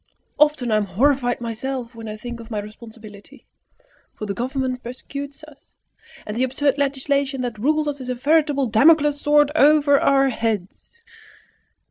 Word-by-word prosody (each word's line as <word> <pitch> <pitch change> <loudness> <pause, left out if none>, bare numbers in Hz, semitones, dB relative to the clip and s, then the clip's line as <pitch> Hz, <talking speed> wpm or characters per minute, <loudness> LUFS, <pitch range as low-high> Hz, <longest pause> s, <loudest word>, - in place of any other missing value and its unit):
Often 295 -5 +2
I 215 - +3
am 210 - 0
horrified 245 +3 +1
myself 240 +2 -5
when 225 -1 -9
I 215 - -6
think 240 +2 -8
of 230 0 -11
my 220 - -4
responsibility; 215 -1 -11 0.7
for 215 - -6
the 200 - -3
Government 255 +2 -3
persecutes 280 +4 -8
us, 305 -2 -17 0.5
and 210 - -5
the 240 - -2
absurd 280 +2 0
legislation 275 -1 -1
that 240 -4 -4
rules 305 +5 +1
us 285 -2 -4
is 255 - -7
a 250 - -1
veritable 290 +1 +2
Damocles' 290 +5 +4
sword 295 0 +3
over 290 -2 +4
our 275 0 +3
heads." 225 - -4
260 Hz, 155 wpm, -21 LUFS, 230-285 Hz, 0.7 s, Damocles